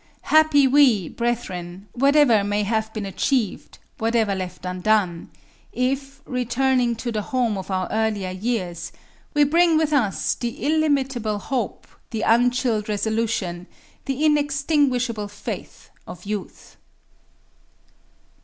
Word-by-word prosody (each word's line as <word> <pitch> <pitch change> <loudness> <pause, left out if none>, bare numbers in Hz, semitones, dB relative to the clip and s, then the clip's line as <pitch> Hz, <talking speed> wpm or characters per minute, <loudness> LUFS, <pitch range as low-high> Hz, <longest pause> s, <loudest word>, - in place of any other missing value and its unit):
Happy 310 -2 +5
we, 255 - +4
brethren, 195 -6 -4
whatever 275 -4 +4
may 205 +1 0
have 220 +1 -1
been 215 -2 -5
achieved, 195 +3 -1 0.2
whatever 225 -2 +1
left 185 -1 -6
undone, 180 -1 0 0.4
if, 275 +2 -2
returning 250 -1 +1
to 235 +1 -4
the 215 -2 -1
home 245 -2 0
of 190 0 -6
our 185 -1 -1
earlier 215 -4 -1
years, 185 -3 -3 0.4
we 295 - +5
bring 330 +2 +4
with 310 -1 +1
us 205 - +1
the 235 -1 -5
illimitable 270 -8 +1
hope, 255 +4 -3 0.2
the 225 -1 -3
unchilled 240 -2 +2
resolution, 210 -4 -1 0.4
the 275 +2 -1
inextinguishable 280 -6 +1
faith 205 - -8 0.2
of 180 +1 -10
youth. 205 -1 -6
230 Hz, 115 wpm, -23 LUFS, 205-270 Hz, 0.4 s, Happy